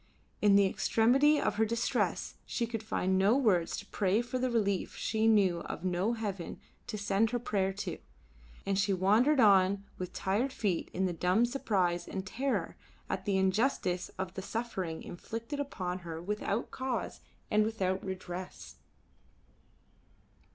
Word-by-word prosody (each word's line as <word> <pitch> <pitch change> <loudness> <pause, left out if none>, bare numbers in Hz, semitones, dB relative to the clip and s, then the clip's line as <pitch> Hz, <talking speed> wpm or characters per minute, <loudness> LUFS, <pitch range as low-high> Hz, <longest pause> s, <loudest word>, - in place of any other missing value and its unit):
In 205 -1 +5
the 200 0 +6
extremity 265 +10 +3
of 205 - 0
her 220 - +4
distress 230 +1 -1
she 235 - -1
could 225 -1 -4
find 190 -3 0
no 205 +6 +4
words 190 -11 +2
to 205 - -7
pray 205 +3 +1
for 250 +1 -3
relief, 225 -6 0
she 220 0 0
knew 195 -6 +4
of 170 - -6
no 185 +5 +1
heaven 200 -7 -4 0.3
to 215 - -4
send 200 +2 +1
her 245 - 0
prayer 200 -5 0
to, 205 - -5 0.7
and 195 0 +1
she 195 0 +2
wandered 215 +10 +3
on 200 -3 +5 0.2
with 180 -1 -4
tired 215 +8 0
feet 195 -9 -1
in 190 +1 0
the 180 - 0
dumb 180 +7 +2
surprise 195 -9 0
and 190 -1 -4
terror 265 +7 -2 0.4
at - - -3
the 200 -2 +1
injustice 190 -2 +1
of 190 -1 -4
the 190 - -5
suffering 190 -7 -4
inflicted 230 - -6
upon 185 -10 -3
her 165 -2 -6
without 210 +4 -2
cause 260 -6 -3 0.3
and 215 0 +4
without 195 -4 -1
redress. 185 - -7
200 Hz, 150 wpm, -31 LUFS, 185-230 Hz, 0.7 s, the